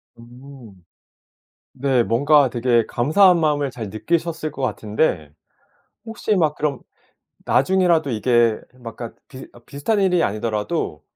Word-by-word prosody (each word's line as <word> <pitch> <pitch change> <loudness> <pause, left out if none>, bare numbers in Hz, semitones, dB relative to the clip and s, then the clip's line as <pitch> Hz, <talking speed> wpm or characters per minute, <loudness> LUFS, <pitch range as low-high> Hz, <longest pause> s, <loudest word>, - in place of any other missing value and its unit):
음. 120 -4 -15 0.9
네 130 -2 +1
뭔가 140 +4 +3
되게 120 -1 +1
감사한 175 +9 +4
마음을 145 -3 0
잘 115 -5 -7
느끼셨을 165 - -2
것 140 -2 -8
같은데 105 - -1 0.7
혹시 225 -1 -2
막 160 -6 +1
그럼 145 -3 -2 0.7
나중에라도 170 0 +2
이게 120 -1 +2 0.2
뭐 120 -2 -9
약간 115 0 -9
비슷 130 -1 -11 0.2
비슷한 200 +10 -1
일이 180 -3 +2
아니더라도 105 0 -3
135 Hz, 260 characters per minute, -21 LUFS, 115-155 Hz, 0.9 s, 감사한